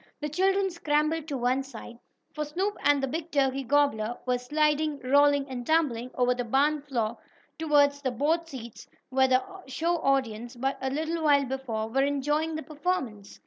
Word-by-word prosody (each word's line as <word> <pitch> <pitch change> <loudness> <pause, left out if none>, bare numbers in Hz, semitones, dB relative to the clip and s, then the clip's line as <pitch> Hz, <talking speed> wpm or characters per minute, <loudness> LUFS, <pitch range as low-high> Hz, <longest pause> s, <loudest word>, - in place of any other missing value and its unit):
The 300 - -3
children 385 +4 +1
scrambled 310 -1 0
to 285 -4 -3
one 250 +2 +1
side, 265 -3 -10 0.3
for 300 - -2
Snoop 370 +8 -2
and 290 -1 +3
the - - +1
big 315 +5 -4
turkey 275 -3 +1
gobbler 245 -4 +1
were 250 -1 +1
sliding, 300 +3 +1
rolling 285 +1 +4
and 255 -3 -5
tumbling 255 -5 +1
over 250 0 +3
the 245 0 -3
barn 280 +5 +2
floor 235 -6 -2 0.4
toward 295 -3 +4
the 285 -2 -4
board 310 +7 0
seats 235 -7 -9 0.2
where 265 0 +3
the 255 0 +3 0.2
show 335 +6 0
audience, 240 -5 -1
but 270 +3 -2
a 265 - -1
little 320 +4 -2
while 285 -2 +4
before, 245 -4 -3
were 260 +5 +1
enjoying 295 +3 0
the 315 - -4
performance. 290 - -4
280 Hz, 175 wpm, -27 LUFS, 255-305 Hz, 0.4 s, rolling